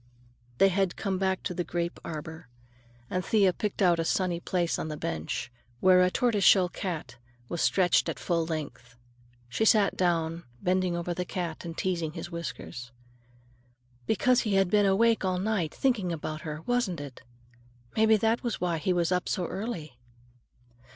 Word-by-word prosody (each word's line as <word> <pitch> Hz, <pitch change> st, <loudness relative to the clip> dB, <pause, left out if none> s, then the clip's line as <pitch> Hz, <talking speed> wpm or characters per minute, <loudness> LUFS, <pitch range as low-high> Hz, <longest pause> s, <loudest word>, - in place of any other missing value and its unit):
_" -, -, -30 dB
They 195 Hz, -, +6 dB
had 190 Hz, -1 st, 0 dB
come 195 Hz, -3 st, -2 dB
back 190 Hz, -1 st, 0 dB
to -, -, -2 dB
the 175 Hz, 0 st, -2 dB
grape 170 Hz, 0 st, -3 dB
arbor, 160 Hz, 0 st, -7 dB, 0.6 s
and 185 Hz, +5 st, -2 dB
Thea 195 Hz, -3 st, +3 dB
picked 205 Hz, +2 st, -2 dB
out 175 Hz, -2 st, +4 dB
a -, -, +1 dB
sunny 175 Hz, 0 st, 0 dB
place 175 Hz, -1 st, -1 dB
on -, -, -3 dB
the 155 Hz, -1 st, -5 dB
bench, 80 Hz, -, -4 dB, 0.3 s
where 185 Hz, -1 st, +6 dB
a 180 Hz, -, +4 dB
tortoise 215 Hz, 0 st, +1 dB
shell 185 Hz, -2 st, +6 dB
cat 170 Hz, -10 st, -5 dB, 0.3 s
was 170 Hz, -, -2 dB
stretched 180 Hz, -2 st, +3 dB
at -, -, -3 dB
full 170 Hz, -1 st, 0 dB
length. 125 Hz, -7 st, -6 dB, 0.5 s
She 125 Hz, -, -1 dB
sat 210 Hz, -2 st, +4 dB
down, 165 Hz, -2 st, 0 dB, 0.2 s
bending 180 Hz, +1 st, +1 dB
over 175 Hz, 0 st, -2 dB
the 180 Hz, -, -2 dB
cat 175 Hz, -3 st, -4 dB
and 165 Hz, -1 st, -6 dB
teasing 170 Hz, -4 st, -1 dB
his 175 Hz, -, -7 dB
whiskers. 125 Hz, -7 st, -6 dB, 1.2 s
"Because 250 Hz, +4 st, +3 dB
he 210 Hz, -4 st, 0 dB
had 195 Hz, -2 st, +3 dB
been 205 Hz, -1 st, +4 dB
awake 225 Hz, +4 st, +3 dB
all 185 Hz, -1 st, 0 dB
night, 190 Hz, -5 st, -1 dB
thinking 225 Hz, -10 st, 0 dB
about 155 Hz, -1 st, -4 dB
her, 155 Hz, 0 st, -6 dB
wasn't 240 Hz, -8 st, 0 dB
it? 140 Hz, -3 st, -9 dB, 0.7 s
Maybe 220 Hz, 0 st, +5 dB
that 225 Hz, +2 st, +1 dB
was 235 Hz, -4 st, -3 dB
why 175 Hz, -2 st, 0 dB
he 180 Hz, +4 st, +1 dB
was 175 Hz, 0 st, +1 dB
up 180 Hz, 0 st, 0 dB
so 185 Hz, -3 st, -1 dB
early." 165 Hz, -, -5 dB
180 Hz, 175 wpm, -28 LUFS, 165-195 Hz, 1.2 s, They